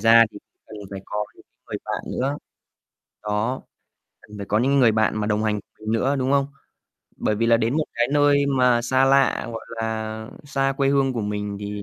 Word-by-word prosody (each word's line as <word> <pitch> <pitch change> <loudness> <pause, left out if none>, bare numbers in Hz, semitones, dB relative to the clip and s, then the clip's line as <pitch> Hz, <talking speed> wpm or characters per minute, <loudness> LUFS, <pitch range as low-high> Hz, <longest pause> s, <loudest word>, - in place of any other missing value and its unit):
ra 115 +1 +7
thì - - -10 0.3
cần 110 - -10
phải 95 - -6
có 105 0 -2
những - - -18
cái - - -54
người - - -4
bạn - - -4
nữa. 140 +3 -1 0.9
Đó, 105 +5 -1 0.6
cần 105 - -13
phải 100 - -6
có 105 +2 +1
những 140 +4 +2
người 115 -3 +5
bạn 110 0 +2
mà 105 -1 -1
đồng 105 0 0
hành 105 -1 0
cùng - - -34
mình 110 0 -3
nữa, 130 +5 +1
đúng 130 +1 0
không? 140 -1 +3 0.7
Bởi 110 - 0
vì 115 +2 0
là 115 0 +5
đến 115 +5 0
một 155 - +1
cái 120 +1 +1
nơi 145 -1 +4
mà 125 -3 +3
xa 130 +2 +3
lạ, 135 0 +3
gọi 115 - -7
là, 110 0 -3 0.2
xa 135 -1 0
quê 135 -1 +2
hương 135 -1 +2
của 120 - -2
mình 105 -1 -3
thì 105 0 -5
115 Hz, 220 wpm, -23 LUFS, 105-135 Hz, 0.9 s, ra